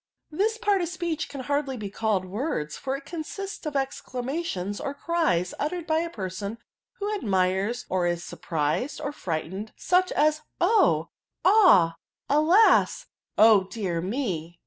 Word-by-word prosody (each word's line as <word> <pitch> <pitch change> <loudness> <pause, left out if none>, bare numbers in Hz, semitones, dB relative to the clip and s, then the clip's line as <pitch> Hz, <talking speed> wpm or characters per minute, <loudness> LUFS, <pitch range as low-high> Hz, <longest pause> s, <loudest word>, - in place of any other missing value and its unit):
" - - -51
This 445 +2 +2
part 410 -4 +2
of 340 - -2
speech 345 -3 -3
can 275 - -6
hardly 285 0 -1
be 205 -3 -6
called 210 -4 0
words; 185 - -3
for 270 0 -3
it 275 - -14
consists 350 +3 -6
of 295 - -4
exclamations, 255 - -3
or 280 - -4
cries, 285 - 0
uttered 335 +3 -2
by 315 -1 +1
a 335 +1 -2
person 200 - -5 0.4
who 415 +1 -3
admires, 200 - 0
or 180 -2 0
is 175 0 -1
surprised, 160 - -2
or 285 -1 -3
£rightened, 190 - -4
such 365 +1 +2
as, 305 +1 +2 0.2
oh 415 +6 +3 0.4
I - - +7
ah! 270 - +6 0.3
alas 320 +9 +4 0.3
i - - +6
O 215 -4 +6
dear 190 -4 -3
me 180 - -3
265 Hz, 155 wpm, -26 LUFS, -, 0.4 s, I